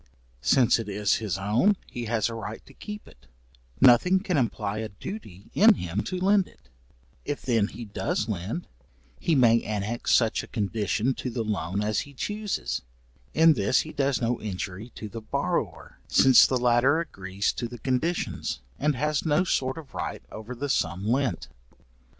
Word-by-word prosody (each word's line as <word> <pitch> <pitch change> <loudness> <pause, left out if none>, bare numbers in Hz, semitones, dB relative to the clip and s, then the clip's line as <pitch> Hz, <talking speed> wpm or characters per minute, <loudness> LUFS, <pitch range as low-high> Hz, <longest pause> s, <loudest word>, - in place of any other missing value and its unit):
Since 120 - +4
it 110 -2 -5
is 100 0 +1
his 105 -6 -2
own, 115 - +2
he 120 -1 -6
has 110 -1 +1
a 115 - -5
right 115 -1 -7
to - - -16
keep 210 -1 -8
it, - - -19 0.5
nothing 135 +9 +6
can 185 -2 -2
imply 110 -6 -1
a 110 -1 -4
duty 100 - -9
in 215 +1 +7
him 90 - -3
to 185 - -3
lend 195 +1 +3
it; 60 - -23 0.5
if 145 -1 -4
then 115 -5 +2
he 120 - -8
does 105 0 -2
lend, 105 - -4 0.5
he 165 - +1
may 115 -3 +5
annex 110 +2 0
such 115 -2 +2
a - - -11
condition 110 +3 -1
to 130 - -5
the 115 -1 -2
loan 100 -2 -2
as 105 0 0
he 145 -2 -7
chuses, 210 +6 -3 0.5
in 165 0 +7
this 110 0 +2
he 155 - -8
does 140 -1 +1
no 120 0 -1
injury 100 +1 -5
to 110 - -6
the 115 +2 -7
borrower, 110 - -3
since 130 -2 +7
the 130 - +1
latter 125 +5 +3
agrees 95 - -2
to 120 - -3
the 120 +1 -9
conditions, 130 - -2 0.2
and 150 0 +1
has 150 +2 0
no 155 +2 +2
sort 130 -6 0
of 150 -4 -10
right - - -4
over 110 +4 -7
the 140 +4 -3
sum 95 -5 0
lent. 130 +2 0
120 Hz, 175 wpm, -26 LUFS, 105-145 Hz, 0.5 s, in